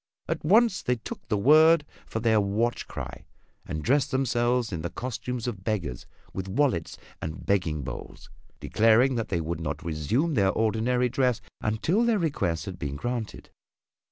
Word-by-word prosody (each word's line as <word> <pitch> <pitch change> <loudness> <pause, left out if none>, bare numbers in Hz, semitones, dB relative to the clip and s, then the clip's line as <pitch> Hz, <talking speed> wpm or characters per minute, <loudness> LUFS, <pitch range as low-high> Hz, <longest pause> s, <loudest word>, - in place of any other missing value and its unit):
At - - -2
once 215 +5 +4
they 125 - +1
took 115 - -9
the 105 - +1
word 155 +7 +6 0.2
for 110 - -3
their 110 -2 +3
watch 110 +4 -1
cry - - -7 0.4
and 75 - -4
dressed 140 +2 +2
themselves 120 -3 +1
in 85 -4 -3
the 85 - -3
costume 125 +2 -4
of 105 -7 -4
beggars 85 - -3 0.3
with 95 0 -4
wallets 95 - 0 0.2
and 80 +4 -6
begging 85 -7 0
bowls, - - -8 0.3
declaring 115 +4 +4
that 115 -2 -2
they 85 -4 0
would 80 +1 -3
not 75 0 -4
resume 85 - 0
their 100 -6 +3
ordinary 115 +4 +1
dress 125 -1 +1 0.2
until 160 - +1
their 235 -2 +3
requests 100 - -1
had 95 -3 -7
been 70 0 -3
granted. 120 - -4
115 Hz, 160 wpm, -27 LUFS, 95-130 Hz, 0.4 s, word